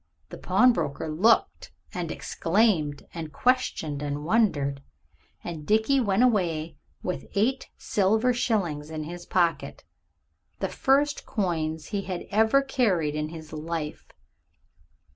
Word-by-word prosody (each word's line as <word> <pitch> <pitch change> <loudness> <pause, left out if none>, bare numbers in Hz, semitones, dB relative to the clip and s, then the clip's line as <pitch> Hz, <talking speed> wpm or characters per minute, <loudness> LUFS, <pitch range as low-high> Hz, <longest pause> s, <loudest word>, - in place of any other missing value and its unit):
The - - -8
pawnbroker 230 - +2
looked 205 +9 +2 0.2
and 175 -3 -3
exclaimed 165 -6 0
and 160 -3 -6
questioned 160 - 0
and 145 0 -3
wondered, 150 -9 +1 0.6
and 165 -3 -6
Dickie 220 - +3
went 210 -1 +2
away 170 - +1 0.3
with 180 - -4
eight 250 +7 +1
silver 220 +5 +2
shillings 175 -11 -1
in 155 -1 -4
his 175 +3 -8
pocket, 170 -2 0 0.7
the - - -2
first 285 +2 +1
coins 160 -6 -2
he 200 - -1
had 185 -3 -5
ever 220 +6 +4
carried 195 - +1
in 150 0 -2
his 160 -1 -10
life. 155 0 -5
175 Hz, 120 wpm, -26 LUFS, 155-220 Hz, 0.7 s, ever